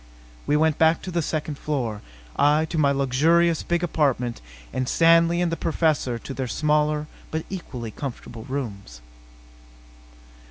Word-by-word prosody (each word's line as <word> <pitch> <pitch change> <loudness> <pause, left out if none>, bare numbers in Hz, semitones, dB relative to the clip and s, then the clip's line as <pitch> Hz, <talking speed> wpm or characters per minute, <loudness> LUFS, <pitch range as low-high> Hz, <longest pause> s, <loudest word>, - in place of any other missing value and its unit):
We 150 - +3
went 155 -1 +2
back 160 0 +3
to 185 - -5
the 170 -1 0
second 150 -1 -3
floor. 120 -8 -2 0.3
I 150 +2 +3
to 165 - -1
my 140 -2 +4
luxurious 155 +5 +2
big 175 0 -1
apartment 135 -8 0 0.3
and 130 -1 -1
Stanley 165 +1 +4
and 170 - 0
the - - 0
Professor 155 -6 0
to 135 - -8
their 130 -1 -3
smaller 150 +2 +1 0.2
but 160 0 -3
equally 125 - -6
comfortable 120 -3 -7
rooms. 105 - -5
150 Hz, 145 wpm, -24 LUFS, 130-165 Hz, 0.3 s, my